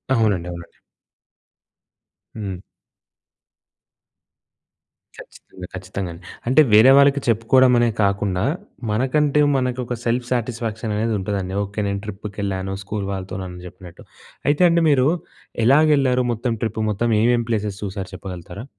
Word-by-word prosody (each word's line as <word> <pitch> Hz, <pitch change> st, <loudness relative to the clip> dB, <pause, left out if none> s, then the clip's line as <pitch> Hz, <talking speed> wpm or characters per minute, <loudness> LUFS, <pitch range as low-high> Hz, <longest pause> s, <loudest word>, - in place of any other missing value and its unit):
అవునండి, 105 Hz, -7 st, +1 dB
అవునండి. 85 Hz, -1 st, -10 dB, 1.6 s
హ్మ్. 100 Hz, -4 st, -5 dB, 2.6 s
ఖచ్చితంగా, 90 Hz, -1 st, -12 dB
ఖచ్చితంగా 95 Hz, 0 st, -5 dB
అండి. 85 Hz, +1 st, -14 dB, 0.2 s
అంటే 130 Hz, +5 st, +6 dB
వేరే 110 Hz, +5 st, +8 dB
వాళ్ళకి 140 Hz, 0 st, +5 dB
చెప్పుకోవడమనే 120 Hz, +1 st, +4 dB
కాకుండా, 100 Hz, -2 st, 0 dB, 0.5 s
మనకంటే 140 Hz, +6 st, +1 dB, 0.2 s
మనకు 125 Hz, -1 st, -1 dB
ఒక 120 Hz, -, -3 dB
సెల్ఫ్ 120 Hz, +1 st, 0 dB
సాటిస్ఫాక్షన్ 115 Hz, -2 st, -2 dB
అనేది 110 Hz, +1 st, 0 dB
ఉంటదండి. 95 Hz, -1 st, -3 dB
ఓకె. 100 Hz, +1 st, -6 dB
నేను 100 Hz, 0 st, -2 dB
ట్రిప్‌కెళ్ళాను 100 Hz, -2 st, -4 dB
స్కూల్ 100 Hz, 0 st, -4 dB
వాళ్ళతో 95 Hz, -1 st, -5 dB
నన్ను 90 Hz, -1 st, -8 dB
చెప్పినట్టు. 90 Hz, -1 st, -13 dB, 0.5 s
అయితే 150 Hz, +4 st, +1 dB
అండి, 170 Hz, 0 st, +2 dB
మీరు 135 Hz, -2 st, +4 dB, 0.6 s
ఎలాగెళ్లారు 135 Hz, -2 st, +4 dB
మొత్తం 115 Hz, +1 st, -2 dB
ట్రిప్? 110 Hz, 0 st, -2 dB
మొత్తం 115 Hz, +3 st, -1 dB
ఏమేం 120 Hz, 0 st, +3 dB
ప్లేసెస్ 105 Hz, -3 st, -2 dB
చూసారు 95 Hz, -2 st, -5 dB
చెప్పగలుగుతారా? 95 Hz, +3 st, -8 dB
110 Hz, 115 wpm, -21 LUFS, 95-125 Hz, 2.6 s, వేరే